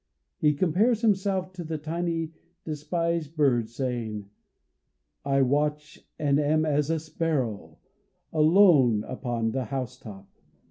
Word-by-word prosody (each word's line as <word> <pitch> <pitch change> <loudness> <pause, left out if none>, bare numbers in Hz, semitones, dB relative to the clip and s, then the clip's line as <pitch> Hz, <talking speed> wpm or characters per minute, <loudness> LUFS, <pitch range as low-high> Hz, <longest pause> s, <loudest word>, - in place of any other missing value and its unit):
He 150 -1 +3
compares 200 - +2
himself 190 -4 +1
to 180 -2 -6
the 160 -1 -4
tiny, 165 +1 -3 0.3
despised 160 +1 -2
bird, 125 -7 +2
saying: 115 -5 -4 0.9
"I 135 -1 +2
watch 150 +3 -1 0.2
and 145 -1 +2
am 155 +2 +2
as 150 -1 +1
a 165 -1 +1
sparrow, 150 -9 -3 0.6
alone 155 - +5
upon 120 -3 -3
the 130 +1 -2
housetop." 120 -6 -6
150 Hz, 110 wpm, -26 LUFS, 130-165 Hz, 0.9 s, alone